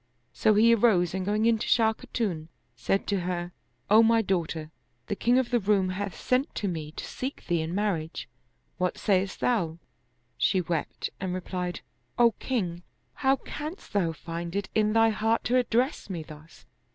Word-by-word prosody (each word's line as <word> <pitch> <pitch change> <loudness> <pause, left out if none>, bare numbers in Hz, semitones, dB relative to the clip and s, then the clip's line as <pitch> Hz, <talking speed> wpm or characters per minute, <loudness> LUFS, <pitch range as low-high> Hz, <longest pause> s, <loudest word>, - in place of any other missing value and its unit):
So 215 - +3
he 230 +3 +6
arose 195 -7 +3
and 190 0 -2
going 210 +2 +1
in 230 -1 +3
to - - -3
Shah 225 -2 +4
Khatun, 190 -8 -3 0.3
said 195 +11 0
to 200 -2 0
her, 175 0 -3 0.2
" - - -43
O 220 +2 +8
my 230 0 +4
daughter, 165 -5 -2 0.3
the - - -2
king 240 +4 +3
of 255 -2 +1
the 240 - +3
Roum 195 -2 +2
hath 190 -1 -4
sent 255 +4 0
to 205 - -2
me 160 -4 -4
to - - -6
seek 265 +2 -6
thee 170 -2 +1
in 160 +3 -3
marriage. 185 -6 -2 0.5
What 180 0 0
sayest 195 -1 0
thou?" 175 -10 +1 0.6
She 190 - +3
wept 170 -3 -3
and 185 -1 -2
replied, 180 -1 -4 0.4
''O 235 -2 +5
king, 180 -10 -2 0.4
how 270 -1 +4
canst 305 +5 -7
tfiou 170 -5 +1
find 170 +2 -6
it 200 -1 -2
in 215 -1 +2
thy 225 0 +5
heart 225 +1 +1
to 245 - +1
address 245 +1 0
me 170 -4 -4
thus? 155 0 -14
200 Hz, 180 wpm, -27 LUFS, 175-225 Hz, 0.6 s, O